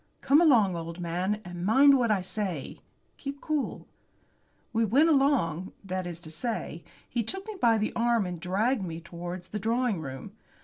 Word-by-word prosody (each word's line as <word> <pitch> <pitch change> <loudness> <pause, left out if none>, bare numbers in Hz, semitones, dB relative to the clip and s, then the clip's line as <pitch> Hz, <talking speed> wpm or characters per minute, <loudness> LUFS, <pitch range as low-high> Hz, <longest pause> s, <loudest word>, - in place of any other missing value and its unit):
Come 290 +4 +5
along, 230 - +5
old 165 +1 -6
man, 180 +5 -1
and 175 0 -6
mind 275 +8 +6
what 245 -3 +2
I 200 -4 +2
say. 185 -6 -4 0.4
Keep 280 0 -6
cool." 305 -2 -2 0.9
We 225 0 +2
went 270 +10 +4
along 265 - +2
that 185 -1 -3
is 170 -1 -6
to 155 - -9
say, 170 -2 -3 0.2
he 240 - -1
took 385 - -3
me 435 -1 -6
by 230 -2 +5
the 215 0 -1
arm 235 -2 +2
and 180 -2 -5
dragged 205 +8 0
me 165 -3 -5
towards 175 +1 -7
the 210 - -4
drawing 230 -1 0
room. 135 +7 -7
210 Hz, 175 wpm, -28 LUFS, 175-245 Hz, 0.9 s, mind